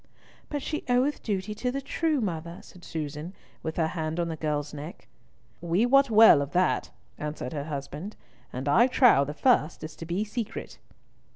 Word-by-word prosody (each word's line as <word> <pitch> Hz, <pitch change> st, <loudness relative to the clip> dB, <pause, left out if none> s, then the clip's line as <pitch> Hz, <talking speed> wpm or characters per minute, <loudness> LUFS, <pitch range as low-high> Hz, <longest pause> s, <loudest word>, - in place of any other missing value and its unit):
"But 290 Hz, -2 st, -3 dB
she 305 Hz, -, -3 dB
oweth 255 Hz, +4 st, +2 dB
duty 205 Hz, -1 st, -2 dB
to 250 Hz, +4 st, -2 dB
the 275 Hz, -, -2 dB
true 300 Hz, +1 st, -1 dB
mother," 170 Hz, -3 st, -4 dB
said 180 Hz, -, -16 dB
Susan, 155 Hz, +3 st, -5 dB, 0.3 s
with 160 Hz, 0 st, -5 dB
her 160 Hz, -2 st, +1 dB
hand 160 Hz, -1 st, -3 dB
on 170 Hz, -1 st, 0 dB
the 160 Hz, -, -3 dB
girl's 150 Hz, -1 st, -2 dB
neck. 150 Hz, +3 st, -9 dB, 0.5 s
"We 175 Hz, +6 st, +2 dB
wot 275 Hz, +2 st, +5 dB
well 220 Hz, -9 st, +8 dB
of 140 Hz, -, -5 dB
that," 180 Hz, +1 st, +1 dB, 0.3 s
answered 150 Hz, +2 st, -5 dB
her 145 Hz, -2 st, -3 dB
husband, 150 Hz, +6 st, -6 dB, 0.4 s
"and 130 Hz, +3 st, -5 dB
I 230 Hz, -, +5 dB
trow 245 Hz, -, +5 dB
the 145 Hz, +2 st, -6 dB
first 175 Hz, -, +2 dB
is 155 Hz, 0 st, -7 dB
to 165 Hz, -, -8 dB
be 180 Hz, +5 st, -1 dB
secret." 225 Hz, +1 st, -6 dB
170 Hz, 180 wpm, -27 LUFS, 150-230 Hz, 0.5 s, well